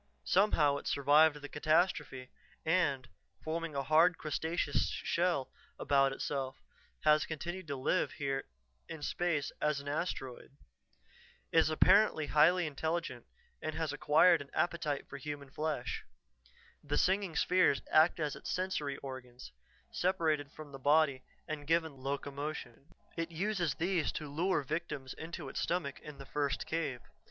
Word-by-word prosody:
Somehow 155 -8 +3
it - - -7
survived 150 +2 +4
the - - -5
catastrophe, 150 -4 0 0.3
and, 145 -7 +1 0.4
forming 165 -1 -3
a 140 - -1
hard, 160 +4 +4
crustaceous 155 -1 -1
shell 170 -6 0 0.3
about 135 -1 +3
itself, 135 -1 -3 0.4
has 155 0 +4
continued 175 +3 -5
to 140 - -3
live 135 +7 0
here 135 -3 -2 0.4
in 155 -2 -7
space 160 -3 -1
as 150 -1 +1
an 140 - -10
asteroid. 140 -3 -4 0.9
"It 165 - +5
is 160 - +3
apparently 180 0 +4
highly 175 +5 +4
intelligent 155 -3 -3 0.3
and 155 - -3
has 160 -1 -2
acquired 160 +2 +5
an 140 - -10
appetite 155 -3 -1
for 140 - -8
human 140 -1 -7
flesh. 150 -4 -3 0.8
The 145 0 -1
singing 190 -3 +1
spheres 180 -6 +3
act 160 +3 +5
as 150 -2 -1
its - - -8
sensory 180 -7 -2
organs, 130 -2 -8 0.4
separated 160 -6 0
from 155 -2 -11
the 135 - -9
body 145 -1 +3 0.3
and 150 -2 -5
given 160 -2 +1
locomotion. 140 -1 -5 0.3
It 165 0 -2
uses 175 -2 -1
these 175 -2 0
to 150 - -5
lure 160 +2 0
victims 140 -2 -4
into 160 -2 -7
its - - -4
stomach 170 -5 -2
in 150 -2 -10
the 135 - -9
first 140 -1 -1
cave. 150 -6 -2
150 Hz, 140 wpm, -33 LUFS, 140-165 Hz, 0.9 s, It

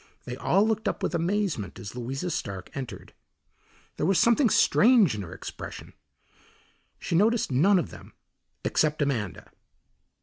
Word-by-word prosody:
They 125 - -5
all 195 +10 +2
looked 220 -1 -1
up - - -2
with - - -1
amazement 170 - -1
as 100 +4 -8
Louisa 135 +8 -4
Stark 95 - -5
entered. 130 -4 -7 0.8
There - - -1
was 195 -1 +3
something 235 +2 +4
strange 220 - +5
in 105 - -4
her 85 - -8
expression. - - -8 1.0
She - - -5
noticed 215 - +2
none 180 +10 +4
of 175 - -2
them - - -13 0.5
except 150 -1 +1
Amanda. 115 - -3
160 Hz, 140 wpm, -27 LUFS, 120-205 Hz, 1.0 s, strange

